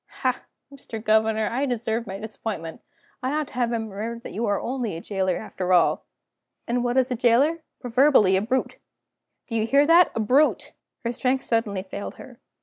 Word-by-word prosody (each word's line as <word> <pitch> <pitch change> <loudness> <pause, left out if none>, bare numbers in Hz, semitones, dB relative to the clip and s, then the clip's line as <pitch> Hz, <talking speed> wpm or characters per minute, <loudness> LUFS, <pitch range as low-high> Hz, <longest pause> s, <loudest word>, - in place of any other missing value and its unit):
Ha, - - +1 0.3
Mr. 235 -5 -8
Governor, 220 0 +2
I 265 +4 0
deserve 235 -1 -2
my 190 0 -5
disappointment! 210 -6 -6 0.4
I 255 +1 -1
ought 305 -1 -1
to - - -16
have 245 -2 0
remembered 225 0 -4
that - - -8
you 225 +4 -2
are 205 - +1
only 240 -8 -3
a - - -6
jailer 190 -1 -1
after 185 -4 -2
all. 175 -2 +3 0.6
And 240 +1 0
what 245 +1 0
is 260 0 +2
a - - +1
jailer? 255 +8 +3 0.2
Proverbially 245 -5 +4
a 190 - +2
brute. 255 +5 -2 0.7
Do 235 - -9
you 220 0 +1
hear 280 +4 +4
that? 340 +3 +6
A - - -1
brute!" 260 +8 +2 0.3
Her 235 - 0
strength 255 +2 0
suddenly 210 -5 0
failed 200 +1 -7
her. - - -13
230 Hz, 185 wpm, -24 LUFS, 210-255 Hz, 0.7 s, that